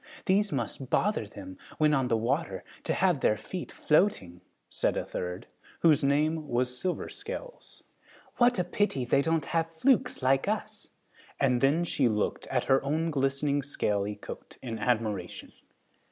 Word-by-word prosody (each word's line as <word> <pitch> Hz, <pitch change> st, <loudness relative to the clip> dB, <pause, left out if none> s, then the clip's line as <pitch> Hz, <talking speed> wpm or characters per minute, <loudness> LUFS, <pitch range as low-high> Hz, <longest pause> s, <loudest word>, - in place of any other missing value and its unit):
These 200 Hz, +1 st, +2 dB
must 130 Hz, 0 st, -3 dB
bother 205 Hz, -, +1 dB
them, 95 Hz, -2 st, -10 dB, 0.2 s
when 155 Hz, -1 st, +4 dB
on 135 Hz, -3 st, +2 dB
the 115 Hz, -, +2 dB
water, 135 Hz, +9 st, -1 dB, 0.2 s
to -, -, +1 dB
have 180 Hz, -5 st, +2 dB
their 105 Hz, -, +2 dB
feet 180 Hz, -, -6 dB
floating," 125 Hz, -, +1 dB, 0.3 s
said -, -, 0 dB
a -, -, -2 dB
third, 90 Hz, 0 st, -5 dB, 0.4 s
whose 155 Hz, -5 st, +5 dB
name 150 Hz, +3 st, +1 dB
was 125 Hz, +1 st, 0 dB
Silver 180 Hz, +7 st, -2 dB
Scales. -, -, -8 dB, 0.5 s
"What 245 Hz, -1 st, +4 dB
a 180 Hz, -, +2 dB
pity 175 Hz, -8 st, 0 dB
they 135 Hz, -, +3 dB
don't 160 Hz, 0 st, 0 dB
have 165 Hz, -1 st, 0 dB
flukes 250 Hz, -, +1 dB
like 135 Hz, +1 st, +3 dB
us," -, -, -3 dB, 0.5 s
and 125 Hz, -3 st, +2 dB
then 145 Hz, +6 st, +3 dB
she 145 Hz, -6 st, +1 dB
looked 105 Hz, -1 st, -1 dB
at -, -, 0 dB
her 135 Hz, 0 st, +3 dB
own 160 Hz, +4 st, 0 dB
glistening 140 Hz, 0 st, +1 dB
scaly 105 Hz, -7 st, -1 dB
coat -, -, -10 dB
in 115 Hz, -3 st, -4 dB
admiration. 110 Hz, -5 st, -2 dB
140 Hz, 155 wpm, -29 LUFS, 120-165 Hz, 0.5 s, whose